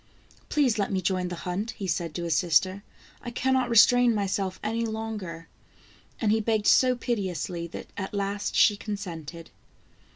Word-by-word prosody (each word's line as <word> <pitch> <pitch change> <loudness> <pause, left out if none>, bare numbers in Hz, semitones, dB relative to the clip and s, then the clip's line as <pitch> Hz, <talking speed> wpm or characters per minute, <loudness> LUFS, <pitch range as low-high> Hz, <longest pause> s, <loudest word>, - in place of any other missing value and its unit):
" - - -29
Please 260 -7 +2
let 200 - 0
me 190 - +1
join 185 0 0
the 175 - -5
hunt," 205 +7 -3
he 200 - -4
said 170 -3 -2
to 175 - -3
his 165 -2 0
sister; 185 +4 +2 0.2
" - - -26
I - - -6
can 260 +2 0
not 255 -2 +1
restrain 240 +1 +6
myself 195 -2 -1
any 225 +2 -1
longer," 215 -7 -5 0.7
and 215 -3 +2
he 220 - +3
begged 220 -1 0
so 255 -1 +5
piteously, 185 -7 -3
that 170 - -9
at 190 -1 -4
last 200 0 -2
she 210 - +5
consented. 170 -6 -7
200 Hz, 175 wpm, -27 LUFS, 180-225 Hz, 0.7 s, restrain